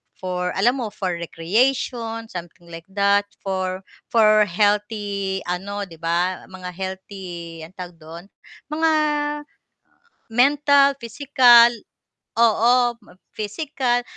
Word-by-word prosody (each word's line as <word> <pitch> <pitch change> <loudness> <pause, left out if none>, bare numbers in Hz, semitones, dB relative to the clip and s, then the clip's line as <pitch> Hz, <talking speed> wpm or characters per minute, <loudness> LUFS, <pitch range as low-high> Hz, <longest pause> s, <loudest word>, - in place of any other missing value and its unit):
for 180 -1 -3
alam 240 +7 +2
mo, 235 - -2
for 190 -3 -3
recreation, 230 +6 -1
something 175 -1 -9
like 165 +2 -10
that, 200 +1 +2 0.2
for 185 -1 -3 0.3
for 215 -2 +5
healthy 205 0 0
ano 195 +3 -3
'di 165 -3 -15
ba, 175 +2 0
mga 185 -1 -8
healthy 185 -2 -7
anong 165 +4 -12
tawag 180 -1 -8
dun, 165 +2 -10 0.5
mga 320 +1 +2 1.4
mental, 280 +3 +4
physical 240 -1 +6 0.7
oo, 235 +2 +4 0.4
physical, 245 +2 -2
200 Hz, 100 wpm, -22 LUFS, 180-235 Hz, 1.4 s, physical